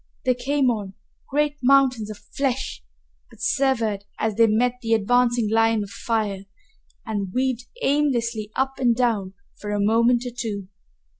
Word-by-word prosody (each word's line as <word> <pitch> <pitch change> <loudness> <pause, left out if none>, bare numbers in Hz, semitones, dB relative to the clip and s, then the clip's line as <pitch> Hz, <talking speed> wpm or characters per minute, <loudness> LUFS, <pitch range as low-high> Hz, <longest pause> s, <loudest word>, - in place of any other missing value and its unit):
They 255 - +4
came 260 +1 +1
on, 200 -4 -5 0.3
great 295 +1 0
mountains 255 -4 +3
of 215 - -7
flesh, 245 - -3 0.5
but - - -18
swerved 230 -7 +1
as 220 -1 0
they 230 +2 +4
met 245 +3 +1
the 225 -2 +2
advancing 240 +1 +2
line 225 -1 +3
of 200 - -10
fire 200 -2 -2 0.6
and 205 -4 -3
weaved 255 +1 -1 0.2
aimlessly 240 -7 +1
up 270 +1 -1
and 240 -3 +3
down 215 -6 0 0.2
for 210 - -6
a 205 0 -1
moment 235 +4 +3
or 245 - -4
two. 205 -5 -4
230 Hz, 150 wpm, -23 LUFS, 210-255 Hz, 0.6 s, They